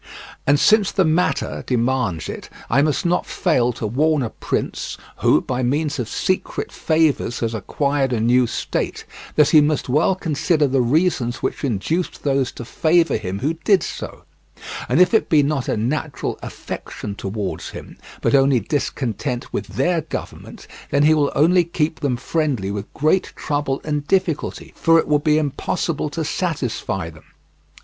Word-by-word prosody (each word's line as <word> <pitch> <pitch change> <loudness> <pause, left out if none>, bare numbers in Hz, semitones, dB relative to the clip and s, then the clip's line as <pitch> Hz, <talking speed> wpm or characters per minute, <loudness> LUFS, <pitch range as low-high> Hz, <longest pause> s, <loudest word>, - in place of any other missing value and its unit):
And 145 +1 +4
since 215 +2 +4
the 190 -2 +2
matter 160 +3 0
demands 120 - 0
it, - - -7 0.2
I 130 +5 +4
must 155 +4 0
not 175 +1 +1
fail 125 -9 +1
to 115 - -5
warn 145 +6 +2
a 115 - -3
prince, - - -3 0.2
who - - +3
by 130 0 -2
means 145 +3 0
of 120 - -3
secret 185 - -2
favours 155 -6 +1
has 115 -1 -1
acquired 140 +5 0
a 120 - 0
new 120 +2 +3
state, - - -3 0.3
that 150 -2 +4
he 155 - +8
must 150 -3 0
well 150 +8 +3
consider 160 -3 +1
the 135 -1 +2
reasons 125 -3 +1
which - - -2
induced 140 - -2
those 135 -3 +1
to 120 - -8
favour 165 +6 +2
him 95 -3 -4
who 150 +5 +1
did 200 -3 +4
so; - - -7 0.7
and - - +3
if 180 +2 +5
it 220 - +3
be 150 -3 +5
not 140 -3 -1
a - - 0
natural 140 +6 -2
affection 100 - -6
towards 100 -1 -4
him, - - -10 0.3
but - - +1
only 135 -2 +5
discontent 125 +1 -3
with - - -3
their 175 -2 0
government, 155 - -7 0.2
then 140 +1 +2
he 155 +1 +6
will 145 -2 +2
only 175 +5 +4
keep 160 -1 -2
them 135 -5 0
friendly 135 -8 -1
with 100 0 -5
great 155 +6 +1
trouble 145 -2 -2
and 150 -1 -2
difficulty, 185 -5 -1
for 165 0 +4
it - - +2
will 150 -1 +3
be 150 0 +2
impossible 150 +1 -1
to 160 +1 -3
satisfy 130 - -2
them. 80 - -17
145 Hz, 165 wpm, -21 LUFS, 125-160 Hz, 0.7 s, he